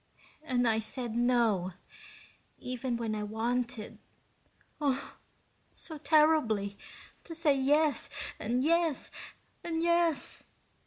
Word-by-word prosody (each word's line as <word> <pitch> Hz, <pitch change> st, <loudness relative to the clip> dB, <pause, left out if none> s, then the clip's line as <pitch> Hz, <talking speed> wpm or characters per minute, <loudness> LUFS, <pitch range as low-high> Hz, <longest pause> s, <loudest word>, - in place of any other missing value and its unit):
"And 250 Hz, -5 st, +1 dB
I 220 Hz, -1 st, +3 dB
said 235 Hz, +1 st, -4 dB
no, 235 Hz, -7 st, +2 dB, 0.8 s
even 250 Hz, -1 st, -3 dB
when 230 Hz, -2 st, -2 dB
I 215 Hz, -, -2 dB
wanted, 230 Hz, +2 st, -2 dB, 0.8 s
oh, 275 Hz, -2 st, -1 dB, 0.6 s
so 315 Hz, -3 st, -8 dB
terribly, 295 Hz, -11 st, +3 dB, 0.5 s
to 330 Hz, -, -8 dB
say 315 Hz, -4 st, +3 dB
yes 290 Hz, +3 st, +2 dB, 0.3 s
and 245 Hz, +4 st, 0 dB
yes 330 Hz, -1 st, +1 dB, 0.5 s
and 330 Hz, -1 st, -1 dB
yes." 340 Hz, -2 st, +1 dB
255 Hz, 100 wpm, -31 LUFS, 225-310 Hz, 0.8 s, I